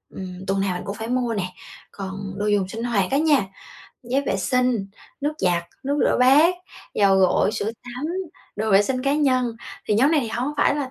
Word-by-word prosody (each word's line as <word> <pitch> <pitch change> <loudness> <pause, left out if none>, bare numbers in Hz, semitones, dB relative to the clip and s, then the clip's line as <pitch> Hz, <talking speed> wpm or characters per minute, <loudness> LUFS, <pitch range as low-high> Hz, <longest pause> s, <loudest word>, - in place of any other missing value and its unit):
ừm, 185 0 -7
tuần 195 0 +1
nào 190 -2 0
mình 180 - -6
cũng 200 +1 -4
phải 220 +1 -6
mua 245 -2 0
nè. 195 -4 -1 0.5
Còn 195 0 -6
đồ 210 - -1
dùng 205 -3 +2
sinh 225 +4 -6
hoạt 210 -5 0
á 275 - +3
nha, 295 -7 +3 0.6
giấy 255 +3 0
vệ 235 - -1
sinh, 250 -1 +1 0.3
nước 295 +2 0
giặt, 175 -2 +1 0.2
nước 285 +2 0
rửa - - +2
bát, 295 +8 +6 0.4
dầu 195 -1 +4
gội, 190 +2 +3
sữa 215 0 -2
tắm, 250 +4 -6 0.5
đồ 215 +1 -1
vệ 195 +1 +6
sinh 255 +3 -2
cá 275 +1 +2
nhân. 255 -5 +1 0.3
Thì 210 - +3
nhóm 265 +8 +4
này 300 - +4
thì 230 - -3
hông 245 +5 -2
phải 290 - +3
là 275 -3 -3
230 Hz, 215 wpm, -23 LUFS, 195-265 Hz, 0.6 s, bát